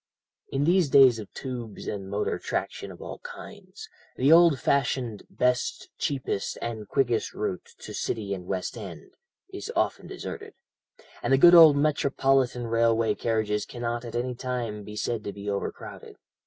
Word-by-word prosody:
"In 135 +1 0
these 175 -1 +3
days 130 -4 +6
of 105 - -9
tubes 120 -5 -7
and 95 -2 -5
motor 100 +1 -1
traction - - -4
of - - -11
all - - -7
kinds, - - -11 0.3
the 135 +4 +3
old 165 -4 +7
fashioned 125 -6 0
'best, 125 0 -1
cheapest, 130 -8 -2
and 110 -3 -5
quickest 120 -3 0
route 95 -4 -4
to - - -9
City 105 -3 -3
and 90 -2 -7
West 95 -1 -3
End' - - -9 0.4
is 395 +4 -6
often - - 0
deserted, 425 -1 -8 0.7
and - - -1
the 135 - +6
good 175 +5 +8
old 160 -4 +9
Metropolitan 135 -4 +1
Railway 115 -1 +2
carriages 110 -2 -1
cannot 120 -1 -4
at 120 -1 -7
any 125 +1 -1
time 120 -4 -4
be 105 +1 -9
said 110 +1 -2
to 100 - -4
be 100 0 -9
overcrowded. 100 -1 -5
120 Hz, 155 wpm, -26 LUFS, 105-135 Hz, 0.7 s, old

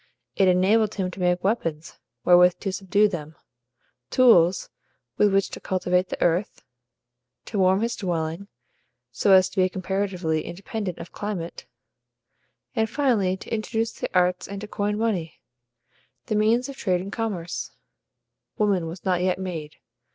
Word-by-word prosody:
It 195 - +3
enabled 200 +4 +3
him 185 -2 -2
to 185 - -10
make 180 0 +1
weapons 165 -7 -2 0.3
wherewith 180 0 +6
to 195 - -2
subdue 200 +2 +2
them; 160 -5 -6 0.7
tools 185 - +4 0.5
with 205 -1 +4
which 195 0 +1
to - - -7
cultivate 180 0 0
the - - -5
earth; 175 +5 0 0.8
to 205 - -3
warm 190 +1 +3
his 235 +1 -1
dwelling, 170 0 -3 0.6
so 200 - +1
as 185 -1 +6
to - - -17
be 185 - +3
comparatively 185 -4 -2
independent 195 +1 -5
of - - -9
climate; 195 -5 -5 1.1
and 220 -1 +1
finally 220 -10 +1
to - - -8
introduce 225 +1 -1
the - - -5
arts 180 0 +1
and 200 0 -6
to 210 - -6
coin 205 0 -2
money, 205 -8 -2 0.9
the 215 - -2
means 225 +4 +2
of 275 - -8
trade 180 -3 0
and 195 +2 -7
commerce. 195 -7 -3 0.9
Woman 200 -6 +1
was 170 +2 -9
not 180 -2 +1
yet 185 0 +1
made. 170 -5 -6
190 Hz, 150 wpm, -24 LUFS, 180-210 Hz, 1.1 s, wherewith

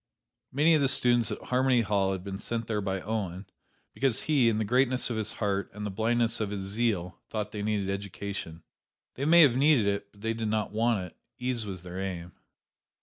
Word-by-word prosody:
Many 150 +5 +4
of 155 - +4
the 135 - +3
students 120 -3 +3
at - - -4
Harmony 130 -1 +2
Hall 100 -3 +1
had 95 -2 -4
been 95 0 -5
sent 115 0 -3
there 105 -2 -1
by 95 -1 -2
Owen, 100 -3 -3 0.5
because 135 -4 +1
he, 140 -7 +3
in 110 - 0
the 110 - 0
greatness 125 +2 +2
of - - -1
his 110 -1 -2
heart 100 -2 -1
and 105 0 -5
the 105 - -3
blindness 115 +3 +1
of 105 -2 -1
his 100 -1 -4
zeal, 100 -3 -1
thought 105 -1 -3
they 105 - -5
needed 105 -2 -1
education. 100 -3 -5 0.5
They 135 - -3
may 170 +2 +8
have 130 -5 +5
needed 140 -4 +4
it; 100 0 -1
but 100 - -20
they 115 +1 -1
did 115 -1 -3
not 105 -1 -1
want 110 -3 +1
it: 90 - -13 0.2
ease 125 -3 -2
was 95 -3 -6
their 90 +1 -7
aim. 90 -2 -4
110 Hz, 210 wpm, -28 LUFS, 100-120 Hz, 0.5 s, may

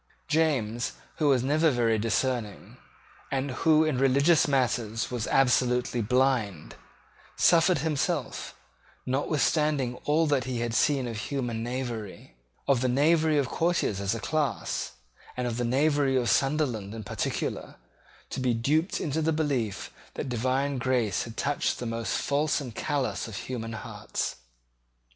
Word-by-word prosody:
James, 125 - 0 0.2
who 150 - +1
was 130 -3 +3
never 155 +4 +3
very 115 -4 +1
discerning, 115 -1 -2 0.5
and 135 0 -1
who 155 +4 +3
in 155 -5 0
religious 140 +5 +4
matters 120 -5 0
was 120 -2 -2
absolutely 125 -2 +2
blind, 115 - 0 0.6
suffered 175 +1 +4
himself, 155 -1 -2 0.5
notwithstanding 145 -1 +1
all 155 +2 +3
that 140 -5 +1
he 125 -2 -3
had 120 -1 -2
seen 135 +1 +2
of 115 -2 -5
human 120 -2 -3
knavery, 115 - -5 0.3
of 135 -4 +3
the 130 - +2
knavery 155 +4 +3
of 140 -3 +1
courtiers 165 - 0
as 100 +3 0
a - - -4
class, 150 +4 -2 0.4
and 125 - -1
of 120 -1 -2
the 120 - -1
knavery 140 +2 +2
of 120 -2 +1
Sunderland 130 -8 0
in 110 - -6
particular, - - -3 0.6
to - - -3
be 125 -2 +1
duped 150 - +1
into 160 0 -1
the 160 +1 +1
belief 135 -10 -1 0.2
that - - -4
divine 130 +3 0
grace 125 -6 0
had 115 -1 -10
touched 145 0 0
the 125 - -5
most 115 -3 -2
false 145 +2 +1
and 130 -5 -7
callous 140 +1 -2
of 110 - -8
human 115 0 -5
hearts. 110 - -4
130 Hz, 145 wpm, -27 LUFS, 115-145 Hz, 0.6 s, religious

